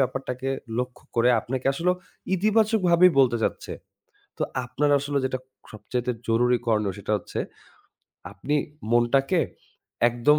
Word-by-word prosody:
ব্যাপারটাকে 130 0 -2 0.3
লক্ষ্য 125 0 -4
করে 120 +2 +4
আপনাকে 130 +3 -4
আসলে 170 +6 +1 0.4
ইতিবাচকভাবেই 195 -4 +4
বলতে 125 -3 +5
চাচ্ছে। - - -2 0.7
তো - - -6 0.2
আপনার 145 +4 0
আসলে 140 0 -2
যেটা 130 -1 -2 0.3
সবচাইতে 120 +4 -3 0.2
জরুরি 120 +2 +3
করনীয় 105 -3 +2
সেটা 100 - -4
হচ্ছে 90 - -6 0.9
আপনি 145 +2 -3 0.4
মনটাকে 135 +8 +3 0.7
একদম 120 +6 +3
130 Hz, 115 wpm, -25 LUFS, 120-150 Hz, 0.9 s, বলতে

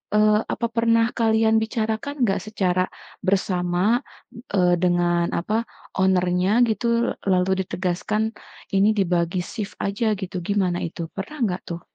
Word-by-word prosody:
eee, 210 0 +5
apa - - -1
pernah 230 0 +3
kalian 220 -1 +3
bicarakan 225 +5 -2
nggak 195 -3 +1
secara 185 -3 0 0.3
bersama, 185 +3 +1 0.5
eee, 180 -2 +4
dengan 175 -1 +2
apa, 215 +6 -1 0.3
owner 190 -1 +3
nya 185 +2 +2
gitu, 235 +2 +1 0.2
lalu 185 0 +2 0.2
ditegaskan, 205 +4 -1 0.4
ini 195 +2 +4
dibagi 180 -1 +1
shift 205 +1 -6
aja 210 +2 0
gitu, 185 -1 -5
gimana 185 -1 0
itu? 170 - -8
Pernah 205 +10 -6
enggak 185 -4 -1
tuh? 170 - -10
195 Hz, 130 wpm, -23 LUFS, 180-220 Hz, 0.5 s, eee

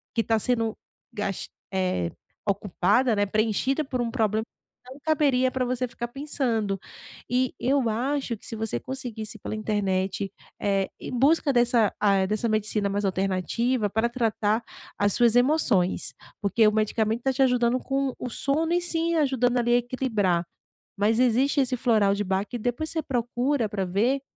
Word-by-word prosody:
que 230 - +2
tá 225 0 +1
sendo 225 -1 0 0.4
gas 195 -2 -3 0.3
eh, 185 - 0 0.4
ocupada, 205 +4 +2
né. 205 0 +2
Preenchida 220 +8 +1
por 255 -2 -2
um 235 - -1
problema, 220 -3 0 0.4
não 260 +3 -11
caberia 275 -5 +2
para 260 0 -1
você 255 0 -1
ficar 240 0 -5
pensando 240 -7 -1 0.5
e 250 0 +1
eu 265 -1 +2
acho 255 +2 -1
que - - -27
se - - -6
você 220 - -2
conseguisse 235 - -6
pela - - -5
internet, 195 -2 -1 0.3
eh, 195 -1 0
em - - -7
busca 285 +2 +3
dessa, 240 -3 +3
ah, 195 -2 +3
dessa, 215 +4 -1
hã - - -1
medicina 215 -1 0
mais 200 +1 -1
alternativa 195 +5 0
para 220 +4 +1
tratar 225 -2 0 0.3
as 205 -1 +2
suas 235 -1 +4
emoções, 245 - +2 0.3
porque 215 +2 +3
o - - +4
medicamento 220 +1 +1
está 265 +2 0
te 270 +1 +3
ajudando 250 -1 +3
com 270 0 -1
o 250 - -4
sono 315 +7 0
e 350 - +2
sim 335 -1 0
ajudando 260 -5 +2
ali 240 0 +2
a - - +6
equilibrar. 225 -8 0 0.5
Mas 215 +3 +2
existe 255 +3 +3
esse 255 -1 0
floral 215 -5 +3
de 205 - -1
Bach 190 +1 -1
e - - -1
depois 245 +7 -2
você 320 - -1
procura 245 0 0
para 195 -2 -2
ver. 225 +10 +1
230 Hz, 170 wpm, -26 LUFS, 205-255 Hz, 0.5 s, a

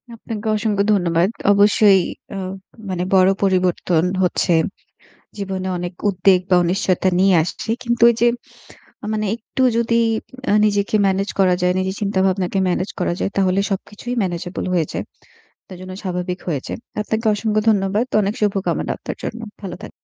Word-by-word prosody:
আপনাকে 220 -1 -6
অসংখ্য 210 -2 0
ধন্যবাদ। 175 -2 +2 0.2
অবশ্যই 205 -1 +5 0.3
অ - - -4 0.5
মানে 180 -1 -2
বড় 185 0 +6
পরিবর্তন 180 -3 +1 0.2
হচ্ছে। 180 -1 +1 0.8
জীবনে 190 -2 -4
অনেক 175 0 -5 0.2
উদ্বেগ 185 -1 +4
বা, 185 - +5
অনিশ্চয়তা 185 +1 +1
নিয়ে 190 0 +5
আসছে। 180 +6 -6
কিন্তু 235 -1 +1
এইযে 235 +1 +2 0.9
মানে 215 0 -1
একটু 235 +3 -4
যদি 235 0 +1 0.6
আ - - +4
নিজেকে 205 0 0
ম্যানেজ 195 +1 0
করা 185 -2 +4
যায়, 180 0 +3
নিজের 190 +1 -2
চিন্তা 200 -2 -1
ভাবনাকে 190 0 0
ম্যানেজ 180 +2 -1
করা 180 - +1
যায়, - - 0
তাহলে 190 -1 +2
সবকিছুই 210 +5 -4
ম্যানেজেবল 175 -1 -3
হয়ে 170 -4 +1
যায়। - - -3 0.6
তার 185 - -9
জন্য 185 0 -8
স্বাভাবিক 180 -1 -3
হয়ে 150 -6 -1
যায়। - - -5 0.2
আপনাকে 220 +2 -2
অসংখ্য 215 0 0
ধন্যবাদ। 200 +2 +1 0.2
অনেক 205 +1 -1
শুভকামনা 200 -2 0
আপনার - - -7
জন্য। 230 - -5 0.2
ভালো 185 -3 -6
থাকুন। - - -8
195 Hz, 155 wpm, -20 LUFS, 180-210 Hz, 0.9 s, বড়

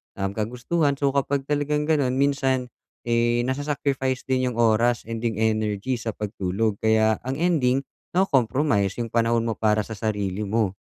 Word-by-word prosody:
um, 100 0 -2
kagustuhan. 125 +8 -1
So, 140 0 +1
kapag 140 0 0
talagang 150 +1 0
ganun, 145 -5 +1
minsan, 135 -2 +1 0.3
eh, 120 0 +2
nasa-sacrifice 135 -1 -1
din 130 -1 0
yung 115 - -8
oras, 115 +1 +3
and 115 0 -5
yung 115 -2 -1
energy 110 +2 0
sa 115 -2 -4
pagtulog. 100 0 -2
Kaya 110 0 +3
ang 130 - -1
ending, 140 -6 +2 0.3
nako-compromise 130 - +2
yung 115 - -7
panahon 115 0 +2
mo 115 - 0
para 110 -1 +2
sa - - -12
sarili 105 -2 -2
mo. 105 -2 0
120 Hz, 155 wpm, -24 LUFS, 110-135 Hz, 0.3 s, oras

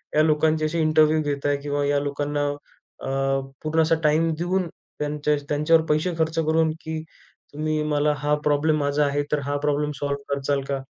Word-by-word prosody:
या 155 - +5
लोकांचे 155 0 +2
असे 160 +2 -1
इंटरव्ह्यू 155 0 +4
घेत 145 -1 -3
आहे 145 0 +2
किंवा 145 0 -1
या 145 0 +2
लोकांना 145 0 -2 0.6
अ, 135 - -4 0.5
पूर्ण 160 +1 +2
असा 160 +1 +3
टाईम 155 +2 +3
देऊन, 180 +1 0 0.3
त्यांच्या, 150 0 0
त्यांच्यावर 155 +2 +3
पैसे 155 +4 +1
खर्च 160 0 0
करून, 160 0 +2
की 160 0 -4 0.5
तुम्ही 155 +1 -1
मला 150 0 +2
हा 145 0 +1
प्रॉब्लेम 150 +1 +2
माझा 145 +1 +1
आहे. 145 +1 0
तर 150 - +2
हा 145 +1 -1
प्रॉब्लेम 150 0 +1
सॉल्व्ह 140 -1 -2
करचाल 140 0 0
का? 140 - -1
150 Hz, 175 wpm, -24 LUFS, 145-155 Hz, 0.6 s, या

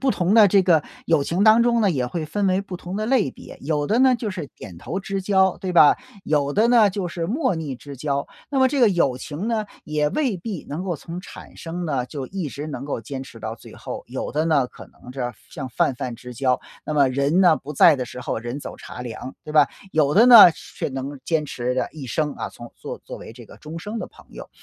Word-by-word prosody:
不 270 -1 +2
同 185 +1 +1
的 215 -3 +8
这 195 0 +4
个 165 -5 +4 0.2
友 155 -4 +3
情 180 +4 0
当 220 +2 +7
中 235 -1 +2
呢， 205 -4 +3
也 130 -6 -1
会 155 +5 -4
分 205 +4 -1
为 185 +1 +2
不 195 -2 -7
同 180 +2 -6
的 215 +1 -2
类 245 - +2
别， - - -12
有 145 0 -1
的 220 +7 +2
呢 260 -1 +5
就 230 -3 -3
是 175 -6 -5
点 85 - -10
头 190 - -4
之 195 0 -4
交， 190 -1 +3
对 185 -1 -4
吧？ 155 -4 +7 0.3
有 145 -2 +1
的 220 +3 +3
呢 225 -5 +5
就 190 -2 -3
是 170 -1 -4
莫 255 - 0
逆 150 -5 -4
之 140 +1 -10
交。 140 +1 -2 0.2
那 280 - 0
么 260 0 +5
这 280 -1 -1
个 235 - +7
友 170 -9 +1
情 155 - -5
呢， 220 -2 0 0.2
也 150 -1 0
未 265 -10 0
必 185 -1 -6
能 160 +6 -4
够 175 -4 -2
从 170 +5 -8
产 - - -12
生 175 +1 -5
呢， 135 -6 -1
就 135 -2 -6
一 185 -6 -4
直 145 +3 -6
能 145 -2 -6
够 140 - -3
坚 130 +4 -6
持 120 -4 -12
到 110 +1 -4
最 - - -14
后。 - - -7
有 - - -5
的 155 +1 +1
呢， 150 -6 +2
可 - - -13
能 125 - -14
是 125 -2 -3 0.2
像 135 -4 -6
泛 155 0 +1
泛 125 0 -5
之 125 +1 -10
交， 130 +1 +1 0.2
那 - - -3
么 140 -2 +4
人 140 +7 +1
呢， 175 -4 +6
不 145 - -8
在 150 +1 +6
的 125 - -3
时 125 - -9
候 120 - -3
人 120 +5 -5
走 - - -8
茶 - - -10
凉， 125 +2 -7
对 150 - -7
吧？ 150 -2 +5 0.2
有 150 -2 +2
的 225 +6 +7
呢， 230 -7 +11
却 - - -6
能 135 +1 -5
坚 160 -2 0
持 125 -1 -3
着 130 - -1
一 145 -4 -8
生， 150 +3 -1
啊， - - -5
从 120 0 -12
作 - - -7
作 - - -8
为 - - -10
这 120 -2 -13
个 - - -14
终 155 +2 -8
生 210 +6 -5
的 - - -4
朋 - - -19
友。 - - -10
155 Hz, 275 characters per minute, -23 LUFS, 135-195 Hz, 0.3 s, 呢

